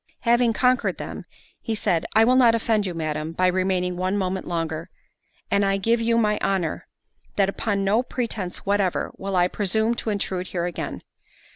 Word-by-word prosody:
—Having 240 -1 +3
conquered 250 +3 +2
them, - - -7 0.4
he 225 - -2
said, 180 -6 0
"I 220 +1 +6
will 250 +2 +4
not 240 -3 +6
offend 220 -3 +1
you, 180 - -4
Madam, 155 0 -3
by 185 +2 +1
remaining 180 -1 +1
one 185 +2 0
moment 190 -1 -2
longer; 165 0 -3 0.6
and 200 - +3
I 195 0 +2
give 230 +4 +1
you 230 0 +2
my 210 -2 +2
honour, 190 -4 -1 0.5
that, 195 -1 +3
upon 200 0 -1
no 205 +4 +3
pretence 225 -8 -4
whatever, 200 -2 0
will 195 0 -3
I 180 0 +4
presume 220 +4 +1
to 225 - -3
intrude 190 -3 -2
here 175 -2 -2
again. 175 - -5
195 Hz, 175 wpm, -24 LUFS, 180-225 Hz, 0.6 s, I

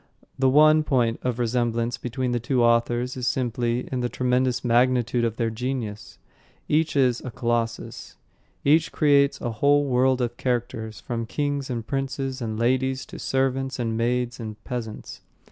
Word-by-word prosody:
The 130 0 +4
one 155 +3 +6
point 120 -6 +1
of 125 -2 -2
resemblance 120 -1 0
between 125 +1 -2
the 120 - 0
two 120 +1 +1
authors 120 +1 +2
is 125 -2 -3
simply 120 -1 -1
in 130 - -1
the 120 0 -1
tremendous 125 0 0
magnitude 120 0 +2
of 115 -2 0
their 115 -1 -1
genius. 115 -3 -4 0.5
Each 155 +1 +1
is 125 -3 +2
a 130 - -6
Colossus. 115 -1 -3 0.5
Each 155 +3 +4
creates 140 -2 +3
a 120 - -2
whole 145 +6 +3
world 130 0 +2
of 120 -1 -2
characters, 115 -4 -2
from 115 -1 -4
kings 145 +1 -2
and 115 -3 -3
princes 135 0 -3
and 110 -2 -3
ladies 130 +3 0
to - - -10
servants 135 0 -1
and 115 -3 -2
maids 120 +2 -1
and 110 -2 -6
peasants. 120 -4 -6
125 Hz, 160 wpm, -24 LUFS, 115-130 Hz, 0.5 s, one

